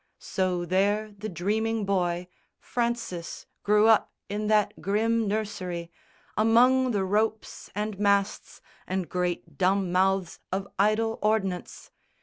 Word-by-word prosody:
So 185 Hz, -2 st, -1 dB
there 205 Hz, +4 st, +1 dB
the 215 Hz, +2 st, -6 dB
dreaming 215 Hz, +5 st, -1 dB
boy, 180 Hz, -2 st, 0 dB, 0.3 s
Francis, 235 Hz, -8 st, -3 dB, 0.2 s
grew 210 Hz, +1 st, +4 dB
up 225 Hz, -2 st, +4 dB, 0.2 s
in 210 Hz, +1 st, -2 dB
that 210 Hz, -1 st, +2 dB
grim 225 Hz, +3 st, +1 dB
nursery 185 Hz, -5 st, -3 dB, 0.4 s
Among 250 Hz, +4 st, +4 dB
the 205 Hz, -5 st, 0 dB
ropes 215 Hz, +3 st, -1 dB
and 210 Hz, -1 st, -3 dB
masts 200 Hz, 0 st, 0 dB, 0.3 s
and 185 Hz, -1 st, -2 dB
great 175 Hz, -4 st, -3 dB
dumb 190 Hz, 0 st, +2 dB
mouths 190 Hz, 0 st, +1 dB
Of 195 Hz, +1 st, -2 dB
idle 220 Hz, +2 st, +2 dB
ordnance. 195 Hz, -4 st, -1 dB
200 Hz, 120 wpm, -27 LUFS, 185-215 Hz, 0.4 s, grew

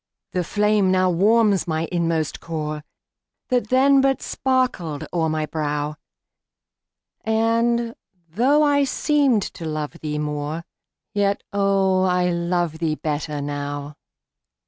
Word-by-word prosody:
The 180 Hz, -, -1 dB
flame 210 Hz, +1 st, +2 dB
now 185 Hz, -1 st, +3 dB
warms 205 Hz, +2 st, +3 dB
my 160 Hz, 0 st, -1 dB
inmost 165 Hz, -3 st, -1 dB
core, 155 Hz, -2 st, -4 dB, 0.7 s
That 245 Hz, -4 st, +1 dB
then 270 Hz, +2 st, +5 dB
but 270 Hz, 0 st, +2 dB
sparkled 250 Hz, -, -1 dB
o'er 165 Hz, -2 st, +1 dB
my 155 Hz, 0 st, -1 dB
brow, 150 Hz, -1 st, -2 dB, 1.3 s
And, 230 Hz, +1 st, +1 dB, 0.4 s
though 270 Hz, -, +3 dB
I 285 Hz, -1 st, +3 dB
seemed 275 Hz, -5 st, +2 dB
to 175 Hz, -, -8 dB
love 155 Hz, -1 st, -3 dB
thee 150 Hz, -1 st, -3 dB
more, 150 Hz, +2 st, -3 dB, 0.5 s
Yet, 200 Hz, -1 st, 0 dB
oh, 195 Hz, -2 st, +2 dB
I 180 Hz, -1 st, +2 dB
love 170 Hz, -2 st, -1 dB
thee 160 Hz, -2 st, 0 dB
better 150 Hz, -1 st, -3 dB
now. 145 Hz, 0 st, -4 dB
180 Hz, 120 wpm, -22 LUFS, 155-225 Hz, 1.3 s, then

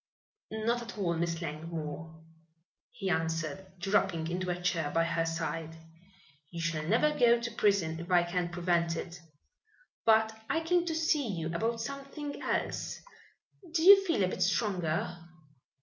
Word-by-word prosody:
"Not 225 Hz, +2 st, -1 dB
at 235 Hz, -1 st, -8 dB
all, 180 Hz, -4 st, 0 dB
Miss 165 Hz, 0 st, -2 dB
Langmore," 160 Hz, 0 st, -6 dB, 0.7 s
he 195 Hz, -6 st, -3 dB
answered, 160 Hz, +2 st, -2 dB
dropping 175 Hz, -3 st, +1 dB
into 180 Hz, +1 st, -2 dB
a 180 Hz, 0 st, -1 dB
chair 170 Hz, -4 st, 0 dB
by 165 Hz, +2 st, +2 dB
her 165 Hz, 0 st, 0 dB
side. 165 Hz, 0 st, -3 dB, 0.7 s
"You 170 Hz, -, -7 dB
shall 165 Hz, -2 st, -1 dB
never 225 Hz, -, +3 dB
go 240 Hz, -3 st, +5 dB
to 235 Hz, 0 st, -4 dB
prison 195 Hz, -7 st, +1 dB
if 170 Hz, +1 st, -8 dB
I 175 Hz, -1 st, +5 dB
can 175 Hz, 0 st, -1 dB
prevent 170 Hz, -1 st, +1 dB
it. 175 Hz, +1 st, -6 dB, 0.8 s
But 220 Hz, 0 st, +4 dB
I 325 Hz, -, +1 dB
came 345 Hz, +1 st, +2 dB
to 325 Hz, -, -1 dB
see 310 Hz, -4 st, +1 dB
you 165 Hz, -5 st, -3 dB
about 225 Hz, +5 st, -1 dB
something 275 Hz, +3 st, -6 dB
else. -, -, -2 dB, 0.8 s
Do 320 Hz, -, +2 dB
you 390 Hz, +2 st, +9 dB
feel 330 Hz, -, +1 dB
a -, -, +3 dB
bit -, -, -5 dB
stronger?" 180 Hz, -4 st, 0 dB
180 Hz, 150 wpm, -31 LUFS, 165-230 Hz, 0.8 s, you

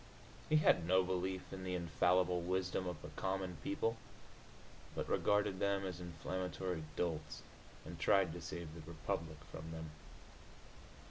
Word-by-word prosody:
He 155 Hz, -, +5 dB
had 90 Hz, -, +5 dB
no 95 Hz, +1 st, +6 dB
belief 95 Hz, +1 st, -2 dB
in 95 Hz, -1 st, -5 dB
the 90 Hz, 0 st, -1 dB
infallible 90 Hz, +1 st, +3 dB
wisdom 90 Hz, +1 st, 0 dB
of 90 Hz, -3 st, -3 dB
the 75 Hz, -, -6 dB
common 95 Hz, +2 st, -2 dB
people, 125 Hz, -6 st, 0 dB, 1.0 s
but -, -, -1 dB
regarded 105 Hz, -2 st, +3 dB
them 100 Hz, -1 st, +2 dB
as 90 Hz, -2 st, -4 dB
inflammatory 90 Hz, +1 st, -2 dB
dolts, 80 Hz, -3 st, -2 dB, 0.4 s
and -, -, -7 dB
tried 95 Hz, -4 st, +4 dB
to 85 Hz, -, -6 dB
save 85 Hz, -2 st, -5 dB
the 80 Hz, -, -8 dB
republic 80 Hz, -1 st, -3 dB
from 80 Hz, 0 st, -6 dB
them. 80 Hz, -1 st, -5 dB
90 Hz, 140 wpm, -38 LUFS, 85-95 Hz, 1.0 s, no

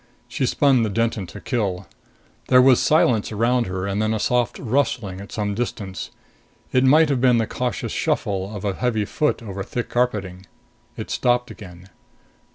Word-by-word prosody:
She 130 Hz, +1 st, -1 dB
spun 135 Hz, -3 st, +3 dB
the 110 Hz, -, 0 dB
Denton 115 Hz, -2 st, -1 dB
to -, -, -10 dB
kill. 100 Hz, -7 st, -2 dB, 0.6 s
There 125 Hz, -, +6 dB
was 130 Hz, -1 st, +6 dB
silence 125 Hz, -9 st, +2 dB
around 120 Hz, +3 st, +1 dB
her 95 Hz, 0 st, -3 dB
and 100 Hz, +1 st, -1 dB
then 110 Hz, +1 st, 0 dB
a -, -, -2 dB
soft 120 Hz, +2 st, 0 dB
rustling 115 Hz, -6 st, -1 dB
at 100 Hz, -, -11 dB
some 105 Hz, -2 st, -2 dB
distance. 100 Hz, -4 st, -4 dB, 0.6 s
It 130 Hz, -, +3 dB
might 150 Hz, +4 st, +5 dB
have 135 Hz, -4 st, 0 dB
been 125 Hz, -2 st, +4 dB
the 115 Hz, -, +1 dB
cautious 125 Hz, +2 st, -3 dB
shuffle 95 Hz, -1 st, -1 dB
of 105 Hz, -, -6 dB
a 100 Hz, -, 0 dB
heavy 110 Hz, -1 st, -1 dB
foot 150 Hz, +1 st, -1 dB
over 100 Hz, -3 st, -6 dB
thick 120 Hz, +4 st, -4 dB
carpeting. 100 Hz, -7 st, -2 dB, 0.5 s
It -, -, -6 dB
stopped 125 Hz, 0 st, +1 dB
again. 90 Hz, -2 st, -12 dB
115 Hz, 170 wpm, -22 LUFS, 100-125 Hz, 0.6 s, There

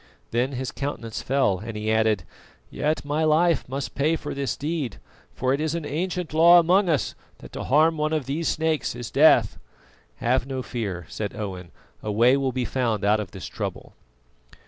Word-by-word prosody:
Then 125 Hz, +4 st, 0 dB
his 130 Hz, 0 st, -3 dB
countenance 120 Hz, -6 st, -4 dB
fell 130 Hz, -9 st, +1 dB
and 110 Hz, +1 st, -6 dB
he 110 Hz, +1 st, -1 dB
added: 110 Hz, -4 st, +2 dB, 0.5 s
"Yet 150 Hz, 0 st, -1 dB
my 150 Hz, +2 st, 0 dB
life 160 Hz, -1 st, +2 dB
must 130 Hz, -2 st, -4 dB
pay 155 Hz, +4 st, +1 dB
for -, -, -5 dB
this 140 Hz, -3 st, -2 dB
deed, 145 Hz, -7 st, -3 dB, 0.4 s
for 130 Hz, +1 st, +1 dB
it 140 Hz, -, -1 dB
is 160 Hz, +1 st, -1 dB
an 165 Hz, -3 st, -3 dB
ancient 175 Hz, +2 st, -3 dB
law 170 Hz, +2 st, +7 dB
among 180 Hz, +3 st, +4 dB
us 155 Hz, -4 st, 0 dB, 0.2 s
that -, -, -13 dB
to -, -, -6 dB
harm 160 Hz, +4 st, +4 dB
one 150 Hz, +1 st, 0 dB
of 155 Hz, -4 st, -1 dB
these 150 Hz, +5 st, -2 dB
snakes 160 Hz, -4 st, 0 dB
is 120 Hz, -1 st, -6 dB
death." 150 Hz, +4 st, +5 dB, 0.6 s
"Have 125 Hz, +2 st, 0 dB
no 130 Hz, -2 st, -4 dB
fear," 100 Hz, -10 st, -4 dB
said 105 Hz, -2 st, -5 dB
Owen, 95 Hz, -4 st, -6 dB, 0.3 s
"a 105 Hz, -, -3 dB
way 120 Hz, +5 st, +5 dB
will 135 Hz, -1 st, 0 dB
be 125 Hz, 0 st, -2 dB
found 115 Hz, -6 st, -1 dB
out 105 Hz, +1 st, +3 dB
of 105 Hz, -3 st, -4 dB
this 95 Hz, 0 st, -9 dB
trouble." -, -, -6 dB
135 Hz, 190 wpm, -24 LUFS, 115-155 Hz, 0.6 s, law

